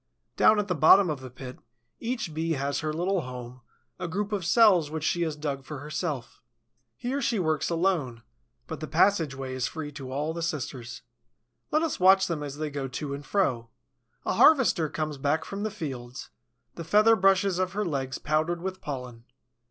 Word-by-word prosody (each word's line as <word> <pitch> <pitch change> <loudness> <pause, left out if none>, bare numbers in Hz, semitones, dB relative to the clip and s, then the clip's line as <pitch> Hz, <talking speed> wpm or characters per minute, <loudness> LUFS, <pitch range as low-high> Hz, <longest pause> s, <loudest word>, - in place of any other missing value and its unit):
Down 215 - +5
at 210 -1 0
the 180 - 0
bottom 175 +3 +6
of 145 - -4
the 130 0 -9
pit, 125 +1 -10 0.4
each 230 -8 -3
Bee 165 +1 -1
has 140 -1 -1
her 155 -1 -2
little 180 +4 0
home, 125 -1 -8 0.4
a - - -3
group 200 +4 -3
of 205 -3 -1
cells 180 -4 +5
which 155 0 -4
she 175 +2 0
has 160 -3 -1
dug 145 -3 -4
for 150 +2 -7
herself. 150 -2 -5 0.6
Here 265 +3 -2
she 235 -3 0
works 160 -5 0
alone; 165 -9 0 0.4
but 160 - -6
the 155 - -5
passage 165 -4 +2
way 135 -1 -5
is 130 -1 -1
free 155 -2 -6
to 135 -3 -8
all 150 +4 -2
the 170 - -5
sisters. 135 -7 -4 0.7
Let 310 +2 +2
us 325 - -2
watch 190 +1 +6
them 170 -5 -3
as 145 -1 -6
they 155 -1 -3
go 140 -1 -3
to 140 +2 -5
and 140 +1 -6
fro. 130 - 0 0.6
A - - 0
harvester 260 - +5
comes 155 -2 -4
back 155 +3 0
from 200 +1 -6
the 215 - -1
fields, 130 - -7 0.4
the 165 - -7
feather 210 +7 +5
brushes 195 -1 +3
of 185 0 -1
her 210 +1 -1
legs 135 -5 -2
powdered 155 +3 0
with 190 0 -4
pollen. 125 -5 -7
155 Hz, 190 wpm, -27 LUFS, 140-190 Hz, 0.7 s, bottom